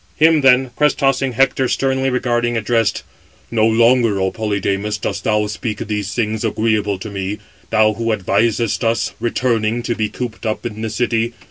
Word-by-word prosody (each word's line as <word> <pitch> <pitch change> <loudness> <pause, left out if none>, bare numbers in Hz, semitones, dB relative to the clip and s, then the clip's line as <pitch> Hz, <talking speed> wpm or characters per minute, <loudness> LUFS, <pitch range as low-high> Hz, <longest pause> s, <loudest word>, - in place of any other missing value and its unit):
Him, 160 0 +4
then, 130 -1 +4
crest 150 0 +2
tossing 135 -2 +1
Hector 130 +1 +2
sternly 135 0 0
regarding, 120 -2 0
addressed: 115 0 0 0.5
"No 110 -1 +3
longer, 115 -2 +3
O 95 0 0
Polydamas, 105 -1 -2
dost - - -4
thou 105 0 +2
speak 105 +1 -4
these 105 -2 -3
things 110 -2 -1
agreeable 110 -2 0
to 105 +3 -8
me, 100 +1 -3 0.3
thou 110 0 +3
who 115 +1 -2
advisest 110 +3 0
us, 115 0 0
returning, 120 -1 0
to 120 - -1
be 110 -2 -2
cooped 120 -3 -6
up 110 +1 -3
in 110 -2 -5
the 110 - -2
city. 115 +1 -1
115 Hz, 165 wpm, -18 LUFS, 105-120 Hz, 0.5 s, Him